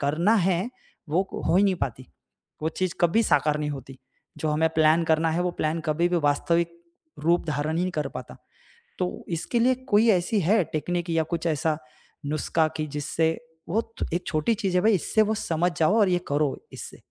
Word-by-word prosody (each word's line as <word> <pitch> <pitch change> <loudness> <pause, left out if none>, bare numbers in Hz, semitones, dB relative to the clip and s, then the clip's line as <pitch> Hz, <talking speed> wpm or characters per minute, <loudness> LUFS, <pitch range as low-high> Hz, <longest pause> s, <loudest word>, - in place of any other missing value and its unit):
करना 165 +9 +2
है, 185 0 +1 0.4
वो 185 +6 +1 0.2
हो 170 - +3
ही 195 - +5
नहीं 195 - +3
पाती, 130 -4 -4 0.6
वो 160 - +1
चीज़ 180 +2 -2
कभी 175 +6 +4
साकार 150 -5 +2
नहीं 150 -1 -2
होती। 135 -2 -8 0.4
जो 155 - -1
हमें 155 +2 +2
प्लान 160 +1 +4
करना 160 0 +2
है 165 +2 0
वो 180 - 0
प्लान 155 +2 0
कभी 165 +2 +1
भी 175 - +1
वास्तविक 170 +4 +2 0.5
रूप 170 +2 +3
धारण 155 +1 -1
ही 175 - +1
नहीं 185 - -1
कर 150 -2 -2
पाता। - - -8 0.6
तो 180 -1 -3
इसके 170 +8 -1
लिए 255 +2 +4
कोई 210 +3 +4
ऐसी 195 +2 +2
है 195 +4 +3
टेक्नीक 175 +3 -2
या 165 -1 +2
कुछ 170 - -3
ऐसा 160 0 0 0.5
नुस्खा 155 +2 +1
कि 155 - -1
जिससे 155 +3 -1 0.3
बहुत 225 +4 -2
एक 175 - -1
छोटी 155 +8 +1
चीज़ 195 -4 -2
है 180 - +4
भाई 220 +1 +5
इससे 205 +3 +2
वो 215 0 +2
समझ 175 -2 0
जाओ 195 +8 +4
और 205 -3 +4
ये 180 -1 +2
करो 145 -1 0 0.2
इससे? - - -8
165 Hz, 195 wpm, -25 LUFS, 155-185 Hz, 0.6 s, ही